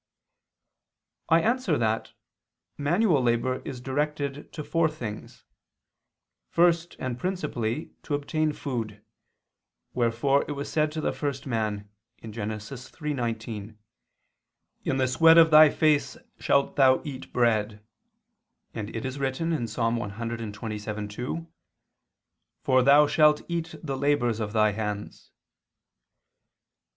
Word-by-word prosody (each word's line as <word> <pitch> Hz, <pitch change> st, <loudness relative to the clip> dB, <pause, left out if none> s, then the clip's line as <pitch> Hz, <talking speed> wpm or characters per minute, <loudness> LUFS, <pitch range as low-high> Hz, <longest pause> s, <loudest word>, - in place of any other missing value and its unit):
I 165 Hz, +1 st, +5 dB
answer 230 Hz, -, +1 dB
that, 110 Hz, -1 st, -1 dB, 0.6 s
Manual 165 Hz, +1 st, +2 dB
labor 125 Hz, +1 st, 0 dB
is 125 Hz, -, -6 dB
directed 145 Hz, +2 st, -3 dB
to 150 Hz, -, -6 dB
four 165 Hz, +1 st, +1 dB
things. 120 Hz, -9 st, -8 dB, 1.0 s
First 170 Hz, 0 st, +2 dB
and 125 Hz, -1 st, -4 dB
principally 155 Hz, -8 st, -3 dB
to 145 Hz, -, -2 dB
obtain 155 Hz, +2 st, -1 dB
food; 115 Hz, -8 st, -5 dB, 0.9 s
wherefore 125 Hz, +4 st, +2 dB
it 145 Hz, -, -3 dB
was 140 Hz, 0 st, -5 dB
said 155 Hz, -1 st, +1 dB
to 155 Hz, -, -3 dB
the -, -, -1 dB
first 140 Hz, -3 st, -4 dB
man 110 Hz, -5 st, -2 dB, 0.4 s
(Gen. -, -, -7 dB, 0.2 s
3:19): 115 Hz, -2 st, -5 dB, 1.1 s
"In 135 Hz, -, 0 dB
the 130 Hz, -1 st, +2 dB
sweat 160 Hz, +6 st, +6 dB
of 165 Hz, -1 st, +7 dB
thy 155 Hz, 0 st, +9 dB
face 150 Hz, -1 st, +1 dB, 0.2 s
shalt 140 Hz, -, +1 dB
thou 130 Hz, -2 st, +5 dB
eat 135 Hz, -3 st, -7 dB
bread," 110 Hz, -3 st, 0 dB, 0.9 s
and 105 Hz, -1 st, -5 dB
it 115 Hz, -, -4 dB
is 130 Hz, +2 st, -4 dB
written 135 Hz, +5 st, -1 dB, 0.2 s
(Ps. -, -, -9 dB
127:2): 110 Hz, +3 st, -4 dB, 1.2 s
"For 130 Hz, 0 st, +4 dB
thou 140 Hz, +3 st, +6 dB
shalt 150 Hz, 0 st, +4 dB
eat 170 Hz, -1 st, -3 dB
the 140 Hz, -4 st, -3 dB
labors 130 Hz, -5 st, +1 dB
of 105 Hz, -2 st, -3 dB
thy 110 Hz, -1 st, +3 dB
hands." 105 Hz, -1 st, -5 dB
130 Hz, 115 wpm, -26 LUFS, 115-150 Hz, 1.2 s, thy